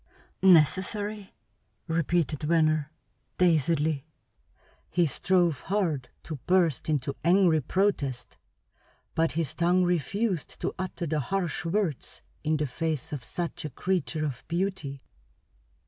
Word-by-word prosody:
"Necessary?" 190 +4 +3 0.5
repeated 165 -2 0
Venner, 155 -1 +2 0.5
dazedly. 160 -3 +2 0.8
He 175 0 +2
strove 175 0 +1
hard 165 -10 0
to 155 - -5
burst 175 -6 +2
into 140 -2 0
angry 170 -2 +4
protest, 140 - -1 0.7
but 165 0 +1
his 160 -3 -1
tongue 175 +2 +3
refused 180 - -1
to - - -1
utter 185 -2 -3
the 155 -1 0
harsh 175 +3 -2
words 170 -5 -2 0.2
in 155 0 +1
the 150 - 0
face 150 +1 -3
of 135 -5 -4
such 170 +7 -4
a 155 - -3
creature 160 +1 -1
of 135 -5 -4
beauty. 170 -6 -2
165 Hz, 115 wpm, -28 LUFS, 150-185 Hz, 0.8 s, angry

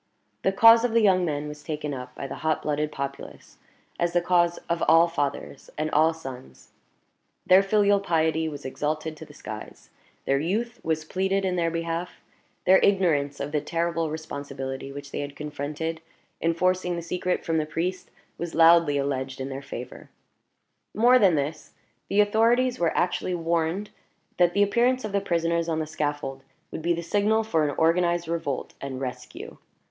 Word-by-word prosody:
The 190 - +2
cause 225 +3 +7
of 245 -2 0
the 230 - +4
young 190 -3 +4
men 150 -2 -2
was 150 0 -8
taken 150 -2 -4
up 125 -1 -8
by - - -6
the 135 - -6
hot 155 -1 0
blooded 150 0 -1
populace, 140 -1 -7 0.4
as 170 0 0
the 175 - +4
cause 175 -1 +2
of 170 0 -1
all 165 +2 +6
fathers 145 -4 -4
and 155 +1 -1
all 160 +2 +4
sons; 125 - -10 0.7
their 185 +1 +7
filial 205 0 +3
piety 160 -3 +1
was 145 -2 -9
exalted 155 +3 -3
to 160 - -10
the 145 - -16
skies; 110 -4 -9 0.3
their 135 0 +2
youth 220 - -2
was 160 -1 -2
pleaded 190 +3 0
in 185 -1 0
their 170 -1 +1
behalf; 165 +1 -4 0.5
their 190 +1 +6
ignorance 160 -8 +2
of 140 +1 -4
the 150 -1 0
terrible 165 +1 -1
responsibility 140 -3 -6
which 140 0 -9
they - - -4
had 145 0 -5
confronted 150 +2 -4 0.4
in 165 0 +1
forcing 180 0 +1
the 170 - -5
secret 180 +1 -2
from 165 -1 +1
the 155 - -2
priest 180 +3 -3 0.3
was 170 -1 -5
loudly 165 -3 +6
alleged 135 -1 -2
in 135 +1 -4
their 135 0 -5
favor. 125 -2 -9 0.9
More 245 +4 +6
than 190 -7 +5
this, 150 +2 -3 0.4
the 205 +1 +4
authorities 230 +4 +2
were 170 -2 +1
actually 180 +1 0
warned 170 +4 -1 0.5
that 175 -1 +4
the 200 - +5
appearance 240 +4 +2
of 215 - -4
the 200 0 0
prisoners 170 -2 0
on 160 - 0
the 160 - -1
scaffold 145 -3 -3 0.3
would - - -5
be 170 +1 +1
the 170 - -5
signal 210 +5 +2
for 165 -8 +1
an 145 - -4
organized 170 +1 +2
revolt 165 -5 -3
and 135 -2 -5
rescue. 125 -1 -7
165 Hz, 175 wpm, -25 LUFS, 145-185 Hz, 0.9 s, cause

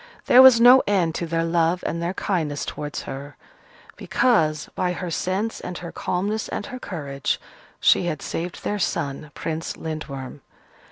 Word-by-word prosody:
There 250 - +8
was 260 -3 +9
no 250 +2 +8
end 185 -5 +2
to 170 - -3
their 165 0 0
love 165 +1 +1
and 170 - -2
their 175 +2 -2
kindness 160 -9 -1
towards 150 -1 -5
her: 140 +2 -8 0.6
because, 155 -12 +1
by 180 -1 -1
her 180 -1 -5
sense 195 +7 -2
and 180 - -6
her 170 - -7
calmness 205 +4 -2
and - - -4
her 255 - -7
courage, 140 - -3 0.4
she - - +4
had 155 -4 -3
saved 175 +2 -5
their 210 - -2
son, 150 -4 -2
Prince 165 0 -4
Lindworm. 145 -4 -6
170 Hz, 160 wpm, -23 LUFS, 155-195 Hz, 0.6 s, was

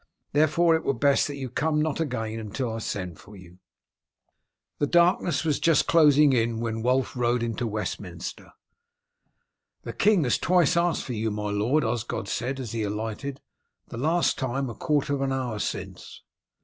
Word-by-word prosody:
Therefore, 155 +3 +3
it 160 - -2
were 140 - 0
best 140 +3 +3
that 145 - -5
you 135 -2 -5
come 150 +5 0
not 155 0 -1
again 115 -7 -3
until 110 +2 -4
I 115 - -4
send 90 -6 -5
for 105 - -14
you." 90 -1 -15 1.2
The 145 - +1
darkness 175 -1 +3
was 155 -3 0
just 165 -3 +3
closing 150 -3 +5
in 115 -2 +1
when 115 -1 -3
Wulf 130 +3 +1
rode 120 -1 +1
into 115 +1 -2
Westminster. 105 0 -5 1.3
"The - - -6
king 205 -5 +3
has 125 - +1
twice 175 -2 +3
asked 170 -1 +1
for 125 - -5
you, 110 0 -1
my 105 0 -3
lord," 115 +9 +1
Osgod 115 -2 -3
said, 130 +5 -3
as 120 -5 -5
he 115 - -3
alighted. 110 +6 -4 0.5
"The - - -7
last 160 +7 +1
time 130 0 -2
a - - -7
quarter 145 +3 0
of 140 - -1
an 135 -1 0
hour 125 -5 -2
since." - - -6
130 Hz, 175 wpm, -26 LUFS, 110-150 Hz, 1.3 s, closing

